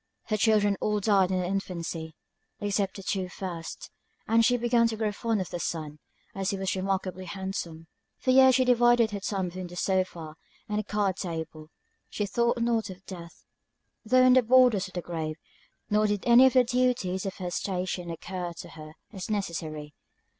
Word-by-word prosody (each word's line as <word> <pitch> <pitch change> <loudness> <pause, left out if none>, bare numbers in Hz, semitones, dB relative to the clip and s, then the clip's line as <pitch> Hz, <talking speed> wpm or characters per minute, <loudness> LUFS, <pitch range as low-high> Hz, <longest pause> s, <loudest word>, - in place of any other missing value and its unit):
Her 215 - +1
children 205 -2 +3
all 210 0 +1
died 195 -3 +3
in 185 - 0
their 180 - -1
infancy, 170 -4 -4 0.4
except 200 -1 -1
the 195 - -8
two 190 -2 -2
first, 175 -3 -7 0.4
and 230 +1 +4
she 245 +2 +3
began 235 0 +3
to 225 -1 -4
grow 215 -1 0
fond 220 0 -1
of 185 - -6
the 175 - -4
son, 155 -3 -4 0.3
as 195 -1 -2
he 200 - -1
was 190 0 -1
remarkably 185 -1 -2
handsome. 185 -4 -5 0.3
For 255 - 0
years 260 0 +7
she 255 0 +3
divided 240 -2 +4
her 205 - -3
time 195 -2 -2
between 185 +1 -7
the 175 - -11
sofa, 175 -4 -2 0.3
and 210 -1 -1
the - - -2
card 205 -2 -1
table. 160 -3 -6 0.4
She 210 - -2
thought 235 +4 +1
not 230 -3 0
of 185 +1 -11
death, 170 -3 -10 0.6
though 255 +3 +4
on 255 - +7
the 255 - +6
borders 245 -5 +4
of 185 - -15
the 175 - -3
grave; 160 -2 -4 0.6
nor 210 +1 +3
did 205 -2 -1
any 245 +2 +8
of 260 - +1
the 255 -1 +6
duties 245 -7 0
of 190 - -5
her 180 -1 -5
station 180 -1 -3
occur 175 +1 -5
to 170 - -10
her 155 -1 -11 0.2
as 190 0 -6
necessary. 160 -7 -4
195 Hz, 190 wpm, -27 LUFS, 175-225 Hz, 0.6 s, any